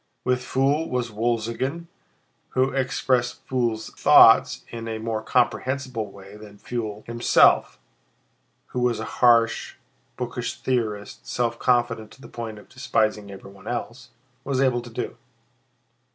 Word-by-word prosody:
With 125 0 +1
Pfuel 140 +5 0
was 125 -2 -2
Wolzogen, 115 +8 -2 0.7
who 130 +1 +2
expressed 130 -2 0
Pfuel's 120 -4 -1
thoughts - - +6
in 115 -1 -7
a 110 -1 -3
more 110 0 -3
comprehensible 125 -1 0
way 100 +1 -13
than 105 -1 -13
Pfuel 110 -2 -5
himself 115 0 +3 0.9
(who 125 - -3
was 125 -2 +1
a 110 - -4 0.2
harsh, 115 -2 +4 0.4
bookish - - -4
theorist, 110 -5 -3
self 120 -1 -1
confident 120 -3 +1
to 135 - -18
the - - -11
point 115 -2 -7
of 105 - -14
despising 110 -5 -1
everyone 100 0 -12
else) - - -5 0.3
was 135 -2 -1
able 130 -3 +2
to 120 - -11
do. 115 - -5
120 Hz, 130 wpm, -24 LUFS, 110-125 Hz, 0.9 s, thoughts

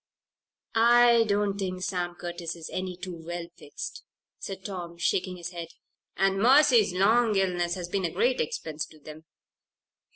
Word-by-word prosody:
"I 235 0 +6
don't 200 -1 0
think 185 -1 -3
Sam 175 -2 -2
Curtis 175 -1 -5
is 165 -2 -9
any 185 -1 -4
too 175 -3 -8
well 175 +1 -5
fixed," - - -8 0.4
said 190 -1 -7
Tom, 175 -4 -6
shaking 180 +2 0
his 175 0 -6
head. 170 -2 -6 0.5
"And 195 0 +2
Mercy's 250 -4 +6
long 215 +4 +3
illness 180 -2 +1
has 180 -2 -5
been 190 0 -1
a - - 0
great 250 +7 +1
expense 155 0 -4
to 155 - -18
them. 155 +1 -12
185 Hz, 155 wpm, -27 LUFS, 175-205 Hz, 0.5 s, I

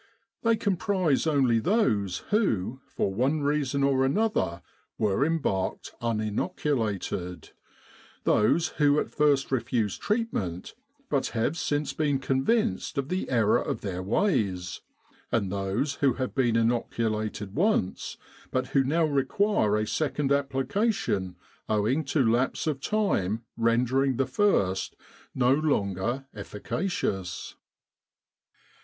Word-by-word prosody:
They 230 -1 +3
comprise 190 -8 +1
only 130 -7 +3
those 110 - +1
who, 130 - +1
for 95 - -2
one 135 +8 +1
reason 140 -1 0
or 135 -1 +3
another, 135 - 0 0.3
were 105 +3 +1
embarked 145 - -1
uninoculated; 110 - -2 0.7
those 155 +10 +3
who 145 -1 +3
at - - -3
first 145 -3 +2
refused 115 -5 -1
treatment, 205 - -2 0.3
but - - 0
have 115 +8 +1
since 145 -3 -1
been 145 -1 +1
convinced 155 - 0
of 140 +1 -1
the 185 +1 -2
error 115 -5 +3
of - - -3
their 95 -3 -3
ways; 100 - 0 0.5
and 100 -5 0
those 100 +8 -1
who 135 -3 +4
have 130 +1 -3
been 120 -4 +2
inoculated 110 -3 -1
once, 175 - 0 0.3
but 130 0 -1
who 135 - +3
now 160 +5 +2
require 140 - +1
a 105 - 0
second 145 +2 -1
application 140 - 0 0.3
owing 110 +8 +1
to 140 -1 +1
lapse 120 +7 +1
of 150 -4 -1
time 120 - 0
rendering 125 +3 +2
the 135 - +2
first 125 - +1 0.4
no 125 0 +4
longer 120 - 0
efficacious. 100 - -3
130 Hz, 115 wpm, -27 LUFS, 105-150 Hz, 0.7 s, who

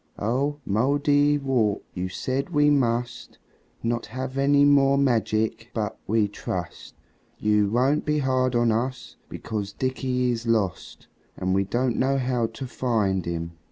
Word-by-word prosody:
"Oh, 135 +7 -1
Mouldiwarp, 140 -1 +2
you 90 0 -3
said 130 - -3
we 145 -3 +3
must 120 -3 -1 0.5
Not 115 0 -1
have 130 +2 -5
any 140 +1 +4
more 140 -1 +4
magic. 115 -3 0
But 105 -2 -2
we 110 0 +2
trust 90 -3 -6 0.4
You 105 -1 +2
won't 130 +7 +2
be 150 0 0
hard 130 -2 +1
on 120 -1 +3
us, 125 +3 -3
because 105 -2 -5
Dickie 130 0 -1
is 115 0 -4
lost 105 -6 -1 0.3
And 95 0 -1
we 95 +1 +2
don't 120 +4 0
know 135 +1 +2
how 125 -3 0
to 115 +4 -8
find 110 -8 0
him." 85 -1 -3
120 Hz, 140 wpm, -25 LUFS, 110-135 Hz, 0.5 s, any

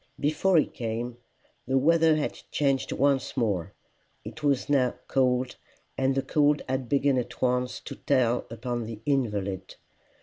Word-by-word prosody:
Before 155 +5 +2
he 155 - +5
came, 120 0 -4 0.5
the 135 +1 +2
weather 160 +3 +4
had 155 - -1 0.2
changed 135 -2 0
once 140 0 +1
more. 100 -9 0 0.5
It 155 - -8
was 140 -3 +1
now 130 -4 +2
cold, 130 -1 +1 0.4
and 135 0 +1
the 135 - 0
cold 150 -1 +2
had 130 -2 -2
begun 140 -2 +3
at 120 0 -6
once 125 0 0
to - - -7
tell 125 -3 +1
upon 120 0 -4
the 110 -2 -7
invalid. 100 -9 -1
130 Hz, 145 wpm, -27 LUFS, 120-140 Hz, 0.5 s, he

